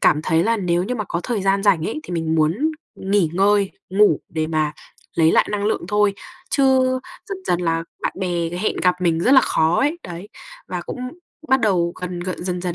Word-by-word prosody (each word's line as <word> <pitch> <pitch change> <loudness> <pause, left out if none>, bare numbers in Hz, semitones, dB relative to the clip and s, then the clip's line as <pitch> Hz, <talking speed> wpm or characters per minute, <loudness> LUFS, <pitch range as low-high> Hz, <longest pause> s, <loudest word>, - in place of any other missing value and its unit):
cảm 150 - +3
thấy 160 +2 +2
là 230 +1 +2
nếu 175 -3 0
như 250 - -2
mà 215 -4 -3
có 170 - -2
thời 225 -6 -2
gian 195 0 +2
rảnh 185 -6 +3
ấy 155 - -4
thì 175 - -8
mình 160 -1 -1
muốn 155 +4 +2 0.4
nghỉ 190 -4 +1
ngơi, 200 +2 +3 0.2
ngủ 195 -5 +4
để 155 -1 -2
mà 155 -1 0 0.4
lấy 160 -1 +4
lại - - +4
năng 205 -1 -1
lượng 210 -4 0
thôi. 210 -1 +2 0.4
Chứ 275 - +2 0.6
dần 390 - -4
dần 175 0 +1
là 165 -1 0 0.2
bạn - - -1
bè 175 -3 -1
hẹn 180 +5 -2
gặp 180 -1 +4
mình 165 -2 +1
rất 250 - +3
là 265 - +8
khó 160 +2 +2
ấy, 300 +5 +1
đấy, 175 +3 -8 0.4
và - - -3
cũng - - -5 0.5
bắt 265 -1 +4
đầu 175 -6 +2
gần 180 -1 -4
g 185 +1 -3
dần 180 0 -3
dần 175 -2 -3
180 Hz, 215 wpm, -21 LUFS, 165-205 Hz, 0.6 s, là